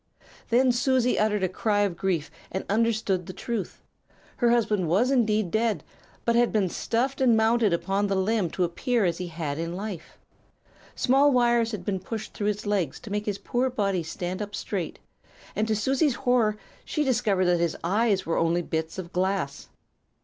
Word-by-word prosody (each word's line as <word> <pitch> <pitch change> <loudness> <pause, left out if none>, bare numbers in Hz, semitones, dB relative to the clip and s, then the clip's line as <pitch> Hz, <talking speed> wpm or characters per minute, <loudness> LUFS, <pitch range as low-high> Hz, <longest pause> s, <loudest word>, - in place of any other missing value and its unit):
"Then 250 +2 +4
Susie 250 0 +2
uttered 210 -2 +1
a - - +3
cry 205 +3 0
of 200 -4 0
grief, 170 -4 -1 0.2
and 190 - -3
understood 210 -4 +1
the 185 - -6
truth. 230 -2 -5 0.5
Her 240 - +3
husband 215 -6 +2
was 205 +11 +2
indeed 215 -7 +2
dead, 220 -1 0 0.4
but 235 - +2
had 240 0 +3
been 200 -4 +1
stuffed 260 +9 -1
and 240 -4 +5
mounted 220 -1 +3
upon 195 +4 0
the 195 - 0
limb 190 -1 +1
to 185 - -1
appear 225 +6 0
as 170 -1 0
he 180 - -3
had 160 -3 -4
in 165 +1 -3
life. 195 -3 -7 0.8
Small 275 +3 +4
wires 240 -2 +3
had 200 -5 -6
been 195 -2 -1
pushed 215 +4 -6
through 205 - -2
his 210 0 -2
legs 195 -8 -1
to 210 - -9
make 210 +1 -2
his 205 -2 -1
poor 245 +5 -1
body 200 -7 0
stand 175 +4 -4
up 205 0 -5
straight, 195 -4 -4 0.6
and 215 - 0
to 220 - +1
Susie's 265 +5 +1
horror 245 -5 +2 0.3
she 305 - -1
discovered 225 -8 +1
that 175 -1 +3
his 170 -1 0
eyes 200 +2 +1
were 165 - 0
only 170 +1 +1
bits 160 +1 -3
of 185 -1 -7
glass! 185 -6 -1
205 Hz, 185 wpm, -26 LUFS, 185-235 Hz, 0.8 s, and